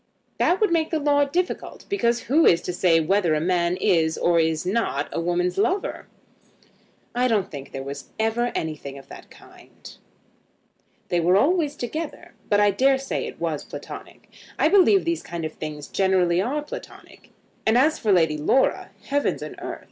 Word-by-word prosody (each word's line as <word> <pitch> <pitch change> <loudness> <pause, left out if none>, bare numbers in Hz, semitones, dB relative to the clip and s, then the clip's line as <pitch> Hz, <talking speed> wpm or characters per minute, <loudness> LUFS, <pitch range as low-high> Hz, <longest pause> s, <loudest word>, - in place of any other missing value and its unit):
"That 360 - +3
would 425 -5 +2
make 325 -2 +1
the 320 - 0
law 285 -1 +2
difficult, 350 +6 -3
because 240 - 0
who 310 +6 +3
is 170 0 +4
to 180 - -3
say 175 -2 +3
whether 170 0 +2
a - - +1
man 175 +1 +1
is 160 -3 +2
or 170 -1 +2
is 160 0 0
not 185 -8 -1
a - - -2
woman's 175 +2 0
lover?" 375 - -1 1.1
"I 250 +1 +2
don't 210 -5 0
think 140 -2 -8
there 135 - -6
was 140 +1 -7
ever 225 +2 0
anything 150 -3 -4
of 135 - -14
that - - -12
kind." - - -16 1.1
"They 175 - +1
were 180 +3 +3
always 300 - +2
together, 305 +5 -6 0.2
but 205 - +3
I 205 0 +4
dare 265 +7 +3
say 270 0 -3
it - - -10
was - - -2
Platonic. - - -10 0.3
I - - +3
believe 390 0 +5
these 335 0 -1
kind 170 -1 -6
of 155 - -5
things 150 -1 -7
generally 185 -2 +2
are 285 +8 -2
Platonic. 295 - -11 0.4
And 220 +2 +4
as 300 +5 +3
for 215 - +1
Lady 160 -5 +3
Laura; 260 - +1
heavens 285 0 -1
and - - -7
earth! - - -6
200 Hz, 180 wpm, -24 LUFS, -, 1.1 s, believe